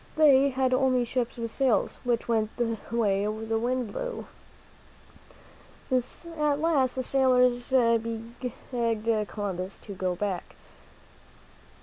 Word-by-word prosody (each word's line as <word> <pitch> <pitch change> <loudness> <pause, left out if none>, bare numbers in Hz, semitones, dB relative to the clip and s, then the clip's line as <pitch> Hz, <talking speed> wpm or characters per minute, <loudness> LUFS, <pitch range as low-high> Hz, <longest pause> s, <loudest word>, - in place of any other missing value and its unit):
They 280 -3 +6
had 260 -1 +1
only 255 -1 +3
ships 245 0 -2
with 230 -1 -4
sails, 260 -4 +1
which 240 -2 0
went 220 -2 0
the 230 -2 0 0.2
way 205 -4 +1
the 220 +1 -2
wind 245 -1 -1
blew. - - -4 1.7
At 300 +4 -1
last 295 -6 +2
the 260 - -1
sailors 250 -2 +3
begged 230 -2 0
Columbus 195 -2 -4
to 205 - -9
go 185 -1 -2
back. 190 -1 -4
240 Hz, 110 wpm, -27 LUFS, 220-260 Hz, 1.7 s, They